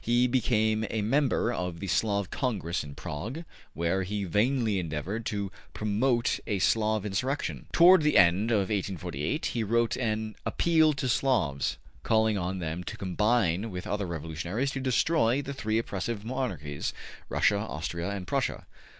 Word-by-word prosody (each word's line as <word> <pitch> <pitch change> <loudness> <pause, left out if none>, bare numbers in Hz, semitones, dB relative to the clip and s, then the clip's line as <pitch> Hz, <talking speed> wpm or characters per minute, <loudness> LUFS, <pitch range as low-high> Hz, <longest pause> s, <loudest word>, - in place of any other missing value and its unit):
He 120 +2 +3
became 110 -3 +2
a 110 -2 -1
member 125 0 +2
of 90 -5 -3
the - - -5
Slav 100 0 0
Congress 100 -9 -1
in 70 -1 -9
Prague, 115 - -5 0.3
where 85 +4 0
he 100 +2 -2
vainly 110 +2 +1
endeavored 90 +7 -3
to 100 -2 -2 0.2
promote 115 +3 +1
a 105 - 0
Slav 110 +2 +2
insurrection. 125 +8 -2
Toward 180 +1 +7
the 150 -1 +3
end 90 +5 +5
of 100 -5 +2
1848, 95 - -2
he 115 - -1
wrote 115 +2 +1
an 110 -3 -2
``Appeal 160 -3 +3
to 135 -1 -2
Slavs,'' 110 - +1 0.2
calling 110 -1 +2
on 95 0 -2
them 85 0 -4
to - - -6
combine 100 0 +1
with 90 -2 -6
other 105 -2 -2
revolutionaries 85 - -3
to 135 - -4
destroy 130 0 +2
the 140 0 -4
three 110 -4 -1
oppressive 110 0 -3
monarchies, 100 - -3 0.3
Russia, 100 -1 +2
Austria 85 -3 -4
and 100 -2 -4
Prussia. - - -1
105 Hz, 150 wpm, -28 LUFS, 90-120 Hz, 0.3 s, Toward